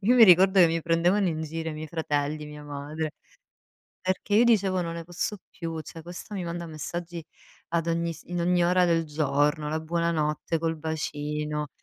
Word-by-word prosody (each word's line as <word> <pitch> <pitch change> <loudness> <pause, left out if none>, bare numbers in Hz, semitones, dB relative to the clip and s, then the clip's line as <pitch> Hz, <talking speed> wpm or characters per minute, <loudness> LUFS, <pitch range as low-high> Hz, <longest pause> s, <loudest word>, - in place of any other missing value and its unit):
io 225 +5 +4
mi 235 - +10
ricordo 190 +1 +6
che 175 - +8
mi 165 0 -1
prendevano 175 +4 +2
in 160 -1 -2
giro 160 +1 -4
i - - -6
miei 155 +1 -6
fratelli, 150 -1 -2
mia 150 0 -10
madre, 145 +2 -4 0.9
perché 185 +2 -1
io 230 - +6
dicevo: 200 -6 +3
"Non 165 0 -4
ne 170 -1 -6
posso 175 +4 -3
più, 165 -2 -5
cioè 165 +2 -10
questa 175 +5 -8
mi 185 - -3
manda 170 0 -4
messaggi 165 +2 -6 0.4
ad 165 -1 0
ogni 170 0 0
s - - -12
in 175 0 -3
ogni 175 0 +3
ora 180 +1 +4
del 165 -1 +2
giorno, 150 0 +1
la 155 +1 -1
buonanotte 165 -1 0
col 165 0 -1
bacino. 150 -1 -3
165 Hz, 190 wpm, -27 LUFS, 155-175 Hz, 0.9 s, mi